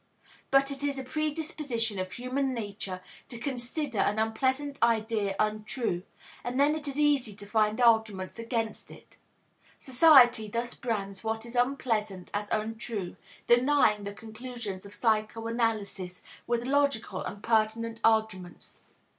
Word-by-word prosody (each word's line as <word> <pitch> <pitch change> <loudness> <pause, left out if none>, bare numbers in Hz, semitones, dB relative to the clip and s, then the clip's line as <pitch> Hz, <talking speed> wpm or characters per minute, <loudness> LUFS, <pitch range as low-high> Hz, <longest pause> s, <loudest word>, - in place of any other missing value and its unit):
But 275 0 +4
it 275 0 -6
is 285 -1 -1
a 265 - -4
predisposition 290 - -2
of 185 -1 -4
human 255 +4 -1
nature 200 -4 -5 0.3
to 240 - -7
consider 245 0 -3
an 210 - +2
unpleasant 260 +6 0
idea 220 -3 +1
untrue, 215 -2 -1 0.4
and 245 +2 -2
then 290 +2 +5
it 310 -1 -5
is 280 0 -4
easy 285 -8 +2
to 205 - -11
find 215 +1 +1
arguments 220 -4 +2
against 230 -1 -3
it. - - -15 0.6
Society 250 -5 +6
thus 235 +3 -3
brands 200 -5 -3
what 225 0 -2
is 235 - -8
unpleasant 225 -7 0
as 205 0 -2
untrue, 220 -3 -3 0.3
denying 240 -4 +4
the 200 0 -5
conclusions 220 -3 -7
of 200 - -12
psychoanalysis 220 -4 -1 0.2
with 240 0 0
logical 270 -7 +1
and 205 - -7
pertinent 225 0 +1
arguments. 220 -5 0
230 Hz, 130 wpm, -29 LUFS, 210-255 Hz, 0.6 s, Society